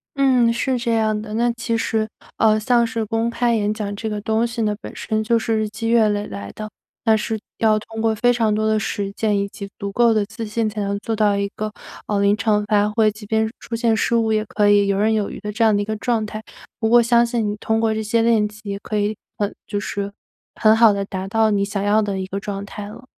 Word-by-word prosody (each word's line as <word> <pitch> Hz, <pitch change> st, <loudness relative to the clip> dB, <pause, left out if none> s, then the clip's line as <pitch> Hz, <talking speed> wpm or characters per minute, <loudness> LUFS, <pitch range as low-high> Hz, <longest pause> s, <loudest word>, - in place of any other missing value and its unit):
嗯， 255 Hz, -4 st, +4 dB
是 255 Hz, +2 st, 0 dB
这 235 Hz, -1 st, -1 dB
样 215 Hz, -1 st, +1 dB
的。 215 Hz, 0 st, -7 dB
那 240 Hz, +1 st, +2 dB
其 235 Hz, 0 st, -2 dB
实， 220 Hz, -1 st, 0 dB, 0.3 s
呃， 215 Hz, -1 st, +4 dB
像 235 Hz, +1 st, +3 dB
是 225 Hz, -1 st, -2 dB
公 225 Hz, +1 st, 0 dB
开 235 Hz, 0 st, +1 dB
演 210 Hz, -1 st, 0 dB
讲 205 Hz, -2 st, -4 dB
这 220 Hz, +2 st, -4 dB
个 210 Hz, -1 st, -3 dB
东 220 Hz, +2 st, +1 dB
西 235 Hz, 0 st, -4 dB
呢， 210 Hz, -1 st, 0 dB
本 -, -, -9 dB
身 220 Hz, 0 st, -2 dB
就 230 Hz, +1 st, +2 dB
是 225 Hz, -1 st, 0 dB
日 215 Hz, -1 st, -1 dB
积 225 Hz, +2 st, -4 dB
月 230 Hz, -2 st, +4 dB
累 205 Hz, 0 st, -1 dB
来 100 Hz, 0 st, -7 dB
的。 215 Hz, 0 st, -7 dB, 0.3 s
那 225 Hz, -2 st, +4 dB
是 220 Hz, 0 st, -2 dB, 0.2 s
要 215 Hz, -1 st, +3 dB
通 225 Hz, +1 st, -7 dB
过 225 Hz, 0 st, +2 dB
非 245 Hz, +3 st, +3 dB
常 225 Hz, -3 st, +1 dB
多 215 Hz, +1 st, 0 dB
的 220 Hz, 0 st, +2 dB
实 205 Hz, -2 st, -2 dB
践 210 Hz, -1 st, 0 dB
以 200 Hz, -, -1 dB
及 200 Hz, 0 st, -9 dB
足 200 Hz, -, -3 dB
够 235 Hz, 0 st, +4 dB
的 215 Hz, -2 st, +1 dB
自 220 Hz, +2 st, -7 dB
信 220 Hz, +1 st, -1 dB
才 210 Hz, 0 st, -4 dB
能 200 Hz, 0 st, -1 dB
做 225 Hz, +2 st, -3 dB
到 205 Hz, -2 st, +2 dB
一 200 Hz, -, 0 dB
个， 215 Hz, 0 st, -3 dB, 0.4 s
呃， 205 Hz, -1 st, 0 dB
临 200 Hz, +1 st, +3 dB
场 210 Hz, -1 st, +1 dB
发 205 Hz, 0 st, +2 dB
挥， 215 Hz, 0 st, +3 dB
即 215 Hz, 0 st, -12 dB
便 220 Hz, +1 st, +1 dB
出 230 Hz, -, -5 dB
现 230 Hz, -1 st, +2 dB
失 220 Hz, -, 0 dB
误， 225 Hz, -1 st, +2 dB
也 215 Hz, 0 st, +1 dB
可 210 Hz, -1 st, +1 dB
以 205 Hz, -1 st, +4 dB
游 195 Hz, -, +1 dB
刃 215 Hz, +2 st, +2 dB
有 215 Hz, -2 st, 0 dB
余 -, -, -8 dB
的 210 Hz, +1 st, -5 dB
这 220 Hz, +3 st, 0 dB
样 220 Hz, -1 st, +5 dB
的 205 Hz, -, +1 dB
一 205 Hz, -, -2 dB
个 220 Hz, -, -2 dB
状 225 Hz, 0 st, 0 dB
态。 215 Hz, +1 st, -7 dB, 0.4 s
不 220 Hz, -1 st, +1 dB
过 240 Hz, +1 st, +7 dB
相 235 Hz, 0 st, +4 dB
信 235 Hz, -3 st, -1 dB
你 205 Hz, -, -2 dB
通 220 Hz, +1 st, 0 dB
过 225 Hz, -1 st, +1 dB
这 220 Hz, 0 st, -2 dB
些 225 Hz, +2 st, +1 dB
练 225 Hz, -2 st, +3 dB
习， 210 Hz, -1 st, -7 dB
可 210 Hz, +1 st, -4 dB
以 210 Hz, +1 st, 0 dB, 0.2 s
很 205 Hz, -1 st, -2 dB
就 205 Hz, -, -3 dB
是， 200 Hz, 0 st, -4 dB, 0.4 s
很 220 Hz, -1 st, +5 dB
好 225 Hz, -1 st, +6 dB
地 200 Hz, -1 st, -2 dB
达 190 Hz, -1 st, -5 dB
到 220 Hz, +1 st, +3 dB
你 200 Hz, -1 st, +1 dB
想 200 Hz, 0 st, -2 dB
要 205 Hz, +2 st, +3 dB
的 200 Hz, -2 st, -2 dB
一 190 Hz, -, -3 dB
个 195 Hz, +1 st, -4 dB
状 200 Hz, -1 st, -5 dB
态 205 Hz, 0 st, -7 dB
了。 245 Hz, +4 st, -12 dB
215 Hz, 285 characters per minute, -21 LUFS, 205-225 Hz, 0.4 s, 过